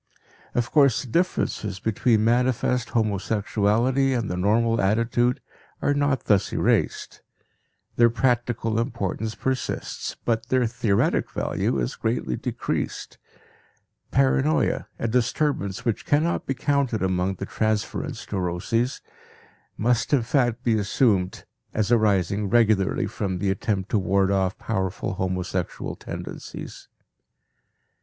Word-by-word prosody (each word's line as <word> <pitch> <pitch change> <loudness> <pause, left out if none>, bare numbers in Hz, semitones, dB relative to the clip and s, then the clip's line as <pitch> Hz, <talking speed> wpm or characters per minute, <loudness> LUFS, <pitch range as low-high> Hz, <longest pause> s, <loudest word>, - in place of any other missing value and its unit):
Of 120 -1 0
course 140 -5 +4
the - - -9
differences 105 - 0
between 110 +1 +2
manifest 125 0 +1
homosexuality 110 +4 +1
and 115 -5 -2
the - - -2
normal 115 +5 +2
attitude 115 +4 +1 0.4
are 145 - +1
not 145 -3 +1
thus 100 -3 +2
erased; - - 0 0.8
their 120 0 +6
practical 120 -2 0
importance 110 -2 -2
persists, 130 -1 -3
but 115 -1 0
their 130 -1 +2
theoretic 110 -3 +1
value - - -1
is - - -2
greatly 60 - -1
decreased. - - -4 0.9
Paranoia, 65 +3 +2
a 115 - -2
disturbance 115 -3 0
which 115 -3 0
cannot 155 +4 +1
be 135 - -1
counted 135 -5 0
among 95 0 0
the 100 - -5
transference 110 0 -2
neuroses, 100 +7 -1 0.8
must 120 +5 +1
in 130 -5 +4
fact 120 -1 +1
be 115 -3 +2
assumed 100 -3 +1 0.3
as 110 +1 0
arising 100 -3 +2
regularly 110 -4 +3
from 95 -3 -3
the 95 +2 0
attempt 95 0 -2
to 105 - +3
ward 95 +1 +2
off 95 0 +1
powerful 95 -3 -2
homosexual 90 -1 -3
tendencies. - - -8
110 Hz, 115 wpm, -24 LUFS, 95-120 Hz, 0.9 s, their